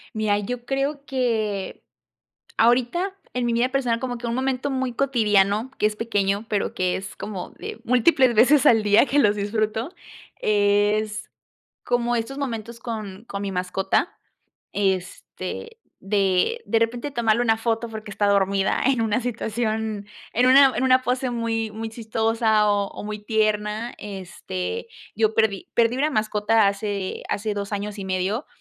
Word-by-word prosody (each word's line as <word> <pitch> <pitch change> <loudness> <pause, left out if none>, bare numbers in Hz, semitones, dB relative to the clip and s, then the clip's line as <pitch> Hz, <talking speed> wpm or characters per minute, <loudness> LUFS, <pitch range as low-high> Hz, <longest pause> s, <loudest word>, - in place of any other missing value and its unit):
Mira, 215 -1 +1
yo 240 +4 -5
creo 275 +2 -2
que, 220 -7 -2 0.7
ahorita 255 - +2 0.2
en 250 -1 0
mi 235 - +1
vida 240 +2 +1
personal, 245 -4 0
como 245 -1 -3
que, 235 - -6
un 235 - -1
momento 265 +1 -1
muy 260 -2 -1
cotidiano 220 -3 +2
que - - +3
es 215 - 0
pequeño, 205 -2 0
pero 205 -2 -1
que 185 -1 0
es 195 +1 -7
como 200 -4 -6
de - - -8
múltiples 250 0 +4
veces 255 +5 +5
al 225 -2 +6
día 210 +5 +5
que 290 - +1
los 210 -3 +3
disfruto, 215 - -2 0.5
es, 210 +1 +1 0.5
como 240 0 0
estos 235 +4 -3
momentos 235 -4 -4
con 215 -3 -6
con 200 -3 -5
mi 200 -1 -3
mascota, 185 +1 -1 0.6
este, 200 - -3 0.2
de 195 - +1
de 230 - +2
repente 235 +5 -1
tomarle 235 -2 +2
una 225 -2 +3
foto 225 0 -1
porque 215 -1 -8
está 205 0 0
dormida 195 -1 +2
en 260 -2 +2
una 225 +1 +1
situación 220 -3 -2 0.3
en 245 +2 +3
una 265 +1 +7
en 245 - 0
una 255 0 +4
pose 255 +1 0
muy, 230 -2 -2
muy 220 +1 -5
chistosa, 220 -1 +1
o 200 -1 +1
o - - -8
muy 210 0 -4
tierna, 215 +1 -1
este, 190 - -5 0.3
yo 220 0 +1
perdí 220 -4 +1
perdí 235 +1 +3
una 300 +2 +2
mascota 215 -2 +2
hace 200 -1 -2
hace 210 +1 -1
2 200 0 -4
años 205 +1 -4
y 195 - -5
medio, 190 +7 -1
220 Hz, 155 wpm, -23 LUFS, 205-245 Hz, 0.7 s, una